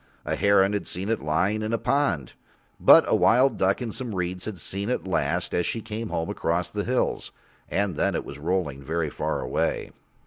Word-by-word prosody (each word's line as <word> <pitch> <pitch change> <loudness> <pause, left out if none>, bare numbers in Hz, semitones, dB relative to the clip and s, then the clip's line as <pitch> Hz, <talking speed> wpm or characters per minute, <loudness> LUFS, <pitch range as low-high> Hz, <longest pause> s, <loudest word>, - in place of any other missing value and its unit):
A - - -1
heron 100 0 +4
had 100 - -2
seen 95 +4 -4
it 115 - 0
lying 95 +8 0
in 110 +1 -2
a - - +2
pond, 110 - 0 0.5
but - - +8
a - - +3
wild 130 +4 +4
duck 95 +6 +2
in 115 - -4
some 120 -2 -5
reeds 90 0 -3
had 110 -3 -5
seen 100 +5 -3
it 125 - -1
last 85 -2 -1
as 90 - +1
she 115 - -2
came 110 +1 -5
home 80 0 -2
across 85 +1 -1
the 105 -1 -2
hills, 125 +3 -1 0.4
and 100 -3 0
then - - 0
it - - -2
was 70 - -9
rolling 75 -4 -1
very 80 +1 -2
far - - -2
away. - - -1
95 Hz, 205 wpm, -25 LUFS, 85-110 Hz, 0.5 s, but